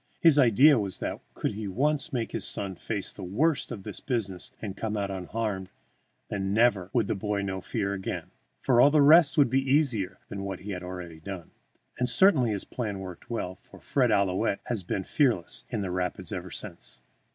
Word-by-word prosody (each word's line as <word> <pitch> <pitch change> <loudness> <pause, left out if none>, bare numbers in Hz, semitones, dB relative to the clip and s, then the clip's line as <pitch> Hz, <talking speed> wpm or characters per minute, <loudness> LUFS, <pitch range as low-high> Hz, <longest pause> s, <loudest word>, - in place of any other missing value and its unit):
His 160 -4 +6
idea 130 +3 +6
was 100 -3 -2
that, - - -4
could - - -1
he 105 0 -5
once 140 - 0
make 120 -5 -2
his - - -2
son 100 -2 0
face 100 +1 -3
the - - -10
worst 130 - +1
of 105 -5 -6
this - - -4
business 100 -8 -2
and 100 -3 -5
come 110 -1 -3
out 100 -1 -2
unharmed, 95 0 -3 0.6
then 95 -1 -2
never 110 -6 +3
would 115 -4 +2
the - - -1
boy 105 0 -2
know 95 -1 -3
fear 100 +2 -2
again, 95 -1 -5 0.3
for 125 -2 +4
all 140 - +7
the 150 +1 +3
rest 160 +2 +6
would 140 -5 +5
be 135 +1 +3
easier 130 -9 +1
than 100 - -6
what 95 -2 -5
he 105 +2 -6
had 90 -2 -4
already 90 -3 -7
done. 90 0 -8 0.5
And 125 0 +3
certainly 155 - +5
his 100 -3 -2
plan 105 -5 -4
worked 95 +2 -9
well, 95 -6 -4
for - - -16
Fred 130 -3 +1
Ouillette 100 -2 +1
has 115 -5 -2
been 95 +2 -3
fearless 95 - 0
in - - -2
the 95 -2 -3
rapids 90 -1 -3
ever 95 -2 -5
since. - - -6
100 Hz, 200 wpm, -28 LUFS, 95-125 Hz, 0.6 s, all